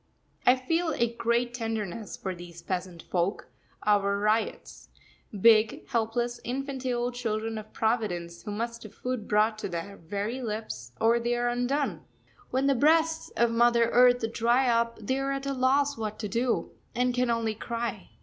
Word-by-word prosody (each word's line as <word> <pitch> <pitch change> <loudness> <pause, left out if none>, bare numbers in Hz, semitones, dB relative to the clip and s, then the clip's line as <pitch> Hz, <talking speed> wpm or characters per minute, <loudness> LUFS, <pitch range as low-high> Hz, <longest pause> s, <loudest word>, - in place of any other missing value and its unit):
I 250 - +8
feel 325 +5 0
a 235 0 +1
great 235 +1 0
tenderness 225 -3 -4
for 190 - -4
these 170 -1 -11
peasant 180 -1 -4
folk 180 +2 -1 0.4
our 200 -1 +3
ryots 215 +2 -1 0.5
big, 220 -1 +5
helpless, 240 0 -1
infantile 255 -1 -2
children 225 -2 -2
of 215 0 -11
Providence, 180 -7 -1
who - - -8
must 230 +3 -3
have 215 - -11
food 250 -4 -4
brought 215 +1 +2
to - - -4
their 175 +4 -5
very 205 +9 -4
lips, 210 - -5
or 230 +1 +4
they 240 +1 0
are 240 0 +1
undone. 245 +4 -1 0.5
When 260 +2 0
the 275 - +4
breasts 320 +4 +3
of 235 0 +3
Mother 235 0 +4
Earth 245 -1 +5
dry 240 +3 +3
up 230 -1 +2
they 260 +6 -1
are 275 0 -1
at 275 0 -4
a 275 - -1
loss 270 +1 +2
what 215 -1 -3
to 210 - -4
do, 235 +4 0 0.2
and 250 +1 +2
can 250 0 +1
only 230 -1 +1
cry. 230 -2 -4
230 Hz, 165 wpm, -28 LUFS, 215-250 Hz, 0.5 s, I